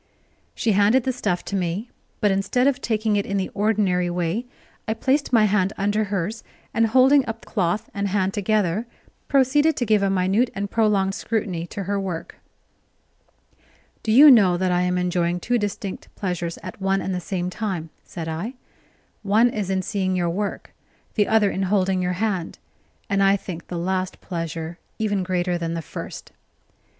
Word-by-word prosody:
She 225 - +1
handed 210 +6 +4
the 260 - 0
stuff 205 -8 -2
to 200 - -3
me, 190 +5 -2 0.3
but 205 -2 +3
instead 200 +6 +1
of 275 -1 +2
taking 215 -2 0
it 200 - 0
in 200 - -1
the 190 - -1
ordinary 200 -4 +1
way, 175 +7 -2 0.4
I 220 - 0
placed 270 +5 +1
my 225 -3 +5
hand 200 -1 +1
under 205 +2 +1
hers, 200 +2 -3 0.3
and, 230 0 +3
holding 260 +4 +5
up 225 0 -6
cloth 200 +2 -1
and 200 0 -1
hand 195 -1 0
together, 210 0 0 0.4
proceeded 290 +3 +3
to 245 - 0
give 215 -2 +3
a 195 - +2
minute 195 +6 +2
and 200 0 -3
prolonged 205 -4 +2
scrutiny 195 -6 -2
to 200 - -5
her 200 +2 -1
work. 185 -4 -5 1.6
"Do 220 - -1
you 285 +6 +9
know 195 -8 +5
that 185 0 0
I 180 0 +2
am 180 0 +1
enjoying 180 -1 0
two 245 +6 0
distinct 205 -2 -4
pleasures 175 -3 -3
at - - -8
one 195 0 +1
and 190 - -3
the 180 - -2
same 180 +1 -3
time?" 180 -7 -4
said 165 -2 -7
I. 170 +11 -4 0.7
"One 220 +4 +3
is 205 -4 -3
in 190 -1 0
seeing 190 -2 -1
your 175 -2 0
work, 200 +3 -4 0.4
the 210 -2 +2
other 220 -2 +3
in 190 - -3
holding 190 -2 +2
your 180 0 0
hand; 190 -3 -2 0.5
and 200 -1 +1
I 195 0 +5
think 175 -4 -7
the 175 - -5
last 185 +1 -2
pleasure 165 -1 -5 0.2
even 205 -3 0
greater 180 -1 -1
than 165 0 -2
the 165 - -3
first." - - -8
195 Hz, 180 wpm, -23 LUFS, 180-220 Hz, 1.6 s, you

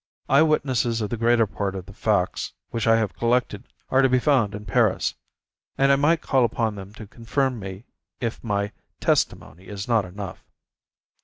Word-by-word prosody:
Eye 140 +2 +5
witnesses 130 -7 +1
of 105 - -3
the - - 0
greater 115 0 +3
part 100 -1 -3
of 95 -2 -6
the 95 - -12
facts 100 -3 0 0.2
which 115 -1 -2
I 115 - +6
have 110 -2 -1
collected 120 -3 0 0.2
are 130 - +5
to 135 - +4
be 130 - +4
found 125 -7 +2
in 105 0 -8
Paris, 95 - +2 0.6
and 135 0 +4
I - - +6
might 150 +4 +2
call 130 -2 +2
upon 115 -1 0
them 100 -1 -9
to 110 - -9
confirm 120 +4 -2
me 95 +2 -8 0.3
if 115 -2 -4
my 100 -2 -1 0.3
testimony 90 +6 -1
is 100 -1 -6
not 115 -3 +3
enough. 95 +1 -8
115 Hz, 180 wpm, -24 LUFS, 100-125 Hz, 0.6 s, I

